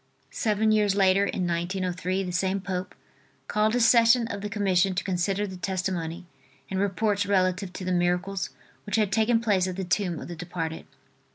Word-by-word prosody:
Seven 215 0 +1
years 210 -2 +3
later, 195 0 +4
in 185 -2 -2
1903, 180 +2 -2
the 180 - -4
same 190 +2 0
Pope 185 -1 -4 0.5
called 215 +2 +1
a - - +2
session 235 0 +5
of 200 - -5
the 210 - -4
commission 195 -2 +1
to 185 - -1
consider 195 +2 0
the 190 -2 -7
testimony 180 -2 -3 0.5
and 190 - -1
reports 200 +1 0
relative 185 -1 +1
to 185 - -6
the 185 - -1
miracles 180 +2 0 0.4
which 205 - -1
had 210 -3 +1
taken 225 +1 +3
place 200 -5 +1
at 185 - -4
the 190 - -3
tomb 175 -2 -1
of - - -8
the 175 - -6
departed. 165 -2 -5
190 Hz, 180 wpm, -26 LUFS, 180-205 Hz, 0.5 s, session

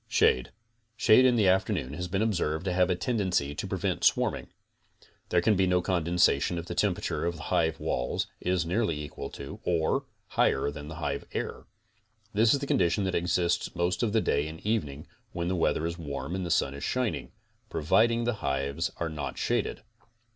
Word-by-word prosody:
SHADE' 65 - +3 0.5
Shade 125 +2 +6
in 125 -1 +5
the 105 -4 +3
afternoon 95 - +1
has 90 +3 -4
been 95 +4 0
observed 85 -6 -1
to 90 - 0
have 90 0 +3
a 90 - +2
tendency 90 - 0
to - - -4
prevent - - -2
swarming. - - +2 0.8
There 90 - +3
can 105 - +4
be 95 0 +2
no 90 0 +3
condensation 85 -2 +2
if 85 - -4
the 85 - -5
tem 95 +1 +2
perature 85 - -2
of 85 - -2
the 80 - -9
hive 80 -1 +1
walls 60 - -1
is 90 -1 0
nearly 85 -3 0
equal 75 -1 -6
to 70 - -8
or 85 -3 +1 0.2
higher 70 +2 +2
than 75 0 -8
the 80 - -7
hive 70 -4 -3
air. - - -4 0.7
This 110 +2 +4
is 140 - +2
the - - -2
condition 90 -5 +2
that 95 -1 -1
exists 90 0 0
most 90 +1 0
of 115 -3 +1
the 110 +1 +3
day 70 -4 +1
and 80 +1 -8
evening 75 -10 -1 0.3
when 85 0 -2
the 95 - 0
weather 80 -2 +1
is 85 +1 -3
warm 75 +1 -5
and 95 0 -2
the 85 - -4
sun 70 -4 +2
is 70 +1 -7
shining; 125 -3 -1 0.4
pro - - -3
viding 115 +9 +3
the 120 +1 +1
hives 70 +3 -1
are 85 - -2
not 70 -4 -5
shaded. - - -1
85 Hz, 200 wpm, -28 LUFS, 75-95 Hz, 0.8 s, Shade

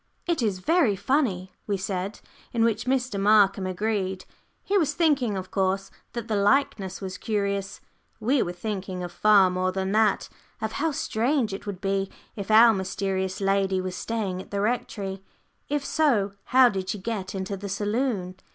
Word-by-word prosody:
"It 340 -5 0
is 210 -5 0
very 280 - +2
funny," 200 -4 0 0.2
we 200 -2 0
said, 190 +1 -4 0.3
in 230 -1 +2
which 230 -2 +1
Mr. 250 -5 0
Markham 200 -2 +4
agreed. 190 -1 -2 0.4
He 405 - -1
was 335 -8 +2
thinking, 275 - +2
of 185 0 -6
course, 195 0 0 0.2
that 235 -2 -5
the 220 - 0
likeness 205 -3 +1
was 185 -1 -5
curious; 200 -3 -2 0.4
we 255 +4 +2
were 175 - -1
thinking 190 -1 -4
of 175 - -5
far 200 0 +5
more 185 0 0
than 190 0 -2
that 215 0 +2 0.3
of 220 0 -2
how 320 +7 0
strange 255 -5 0
it 195 - -7
would 195 -2 -5
be 195 0 0 0.3
if 200 -1 -6
our 225 +1 +8
mysterious 190 -1 -2
lady 195 -1 +1
was 185 0 -4
staying 200 -4 -3
at - - -13
the 200 - -2
Rectory. 200 -4 -2 0.5
If 290 -1 -1
so, 235 -11 +2
how 255 -1 +6
did 190 -3 -4
she 210 - -1
get 200 -2 -4
into 190 +1 -3
the 200 +1 -6
saloon? 205 -2 -1
200 Hz, 170 wpm, -26 LUFS, 190-230 Hz, 0.5 s, our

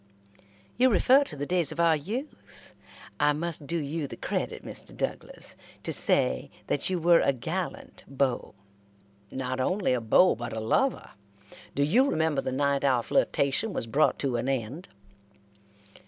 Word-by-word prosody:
"You 255 +2 +5
refer 255 +6 +5
to 155 - -8
the 145 - -3
days 175 -2 +1
of 155 - -7
our 165 -1 +4
youth. 220 - -7 0.5
I 150 0 +4
must 155 -1 -3
do 170 - -1
you 150 0 -3
the - - -9
credit, - - -3
Mr. - - -9
Douglas, - - -5 0.3
to - - -2
say, 65 0 +1 0.2
that 145 - -1
you 185 - 0
were 170 0 +5
a - - +3
gallant 160 +8 -5
beau." 135 -5 -1 0.7
"Not 130 +1 -4
only 185 +3 +1
a 125 - 0
beau, 145 +11 +5
but 120 +1 -6
a 110 - -3
lover. 240 - 0 0.6
Do 140 - +2
you 245 - +3
remember 160 - +1
the 130 - -3
night 140 +1 0
our 130 -4 +2
flirtation 140 - +1
was - - -2
brought 140 +7 +2
to 130 -4 -1
an 125 +3 -2
end?" 135 - -3
145 Hz, 160 wpm, -27 LUFS, 130-175 Hz, 0.7 s, You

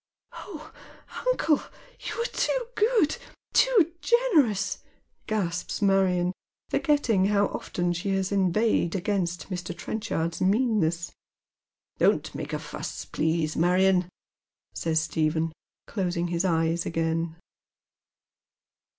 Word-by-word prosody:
" - - -53
Oh, 310 -5 -9 0.5
uncle, 325 -12 +3 0.4
you - - -5
are 465 - +1
too - - 0
good, 430 -6 +3 0.4
too 415 -10 +4
generous," 305 - +2 0.5
gasps 180 -5 -2
Marion, 190 -3 +2 0.4
forgetting 250 - +2
how 205 0 +3
often 175 -1 -2
she 180 +4 -3
has 190 0 -1
inveighed 195 -1 +2
against 185 -2 -2
Mr. 180 -1 -4
Trenchard's 170 -6 -3
meanness. 190 -5 +1 0.4
" - - -57
Don't - - +2
make - - -5
a - - -1
fuss, - - -6
please, 160 -1 0
Marion," 180 +1 +3 0.6
says 160 -1 0
Stephen, 160 +1 0 0.3
closing 175 -4 -2
hia 170 -1 0
eyes 165 0 +1
again. 165 0 -1
185 Hz, 105 wpm, -27 LUFS, 170-225 Hz, 0.6 s, too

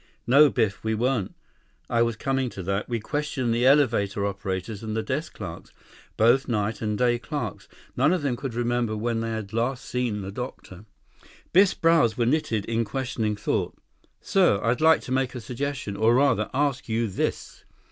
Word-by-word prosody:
"No, 140 +5 +6
Biff. 105 -6 -1
We 110 0 0
weren't. 120 -3 -1 0.5
I 115 - +1
was 115 -1 +1
coming 135 +2 -1
to 95 - -7
that. 100 +5 -2
We 120 -1 -1
questioned 135 0 -2
the 120 +2 +2
elevator 115 -8 +3
operators 100 0 -4
and 110 -1 -4
the 110 - -1
desk 140 +9 -3
clerks. 85 -6 -8 0.5
Both 120 +5 +4
night 110 -2 -1
and 105 -2 -1
day 120 0 +2
clerks. 125 - -5 0.3
None 150 - +3
of 180 -4 0
them 135 -4 0
could 130 -2 -5
remember 120 -2 0
when 115 +1 -1
they 115 0 -2
had 110 -3 -5
last 125 +3 -1
seen 120 -5 -2
the 95 0 -6
doctor." 105 -4 -8 0.7
Biff's 190 +2 +5
brows 165 -8 +3
were 120 - +2
knitted 115 -6 0
in 115 0 0
questioning 110 -2 -2
thought. 105 - -2 0.4
"Sir, 180 - +3
I'd 120 +5 +1
like 160 0 +5
to - - -8
make 130 0 0
a - - -4
suggestion, 125 -1 -4
or, 110 +3 +3
rather, 140 +2 +2
ask 140 -2 -1
you 115 +1 0
this. 95 - -3
120 Hz, 180 wpm, -25 LUFS, 110-135 Hz, 0.7 s, No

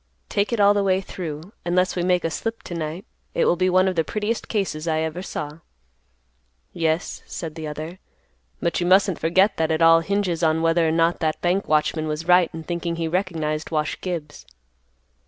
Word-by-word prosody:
Take 205 +2 0
it 235 - 0
all 205 0 +6
the 205 - +1
way 190 -1 +2
through, 175 -1 -7
unless 180 +1 +1
we 180 - 0
make 180 0 +2
a 165 - 0
slip 225 +8 -4
to - - -7
night, 165 +4 -4 0.3
it - - +2
will - - +4
be 185 +1 +1
one 185 +1 +4
of 185 - 0
the 165 - +2
prettiest 215 +6 -2
cases 180 -7 -2
I 160 -1 +1
ever 160 +2 -3
saw." 150 -4 -6 1.1
"Yes," 165 -1 -1
said 165 -3 -6
the 160 -1 -6
other; 155 +4 -6 0.6
"but 170 - 0
you 175 - 0
mustn't 190 -1 +4
forget 190 +6 +3
that 160 0 +1
it 160 +1 +2
all 165 0 +7
hinges 180 -1 -1
on 160 0 +2
whether 165 0 +3
or - - +2
not 165 +1 +2
that 155 -2 -1
bank 180 +3 +1
watchman 155 +1 +1
was 155 +2 -4
right 180 -1 +5
in 160 0 -7
thinking 170 0 -3
he 165 -1 -2
recognized 160 -4 -2
Wash 155 -2 -2
Gibbs." 165 -5 -5
170 Hz, 200 wpm, -23 LUFS, 160-185 Hz, 1.1 s, all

